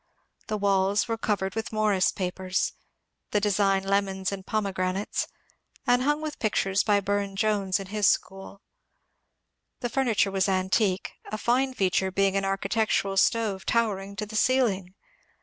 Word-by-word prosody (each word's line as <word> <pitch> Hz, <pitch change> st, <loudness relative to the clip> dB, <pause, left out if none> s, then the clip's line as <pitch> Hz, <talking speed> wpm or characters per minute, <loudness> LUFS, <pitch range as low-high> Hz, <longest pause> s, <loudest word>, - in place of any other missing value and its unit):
The 215 Hz, -, -1 dB
walls 200 Hz, +1 st, +2 dB
were 230 Hz, -, -1 dB
covered 200 Hz, -4 st, -1 dB
with 225 Hz, 0 st, -4 dB
Morris 215 Hz, -3 st, +2 dB
papers 185 Hz, 0 st, -2 dB, 0.3 s
— -, -, -54 dB
the 210 Hz, -, +4 dB
design 195 Hz, -1 st, +2 dB
lemons 195 Hz, -1 st, 0 dB
and 195 Hz, -1 st, -5 dB
pomegranates 195 Hz, -2 st, -1 dB, 0.3 s
— -, -, -34 dB
and 245 Hz, 0 st, +3 dB
hung 295 Hz, +3 st, +1 dB
with 305 Hz, -1 st, -5 dB
pictures 200 Hz, -2 st, +1 dB
by 205 Hz, -2 st, +3 dB
Burne 200 Hz, 0 st, -1 dB
Jones 200 Hz, -2 st, +1 dB
and 195 Hz, -1 st, -8 dB
his 210 Hz, -1 st, +2 dB
school. 195 Hz, +1 st, -1 dB, 1.2 s
The 240 Hz, -, -1 dB
furniture 230 Hz, -6 st, +1 dB
was 195 Hz, 0 st, +1 dB
antique, 190 Hz, +1 st, +1 dB
a 215 Hz, -, -5 dB
fine 255 Hz, +4 st, +1 dB
feature 190 Hz, -1 st, +1 dB
being 195 Hz, +1 st, +1 dB
an 195 Hz, 0 st, +1 dB
architectural 195 Hz, 0 st, 0 dB
stove 210 Hz, -1 st, +2 dB
tower 225 Hz, -4 st, +1 dB
ing 195 Hz, +1 st, -9 dB
to 210 Hz, +1 st, -3 dB
the 215 Hz, +1 st, -9 dB
ceiling. 210 Hz, -7 st, +1 dB
200 Hz, 155 wpm, -26 LUFS, 190-215 Hz, 1.2 s, the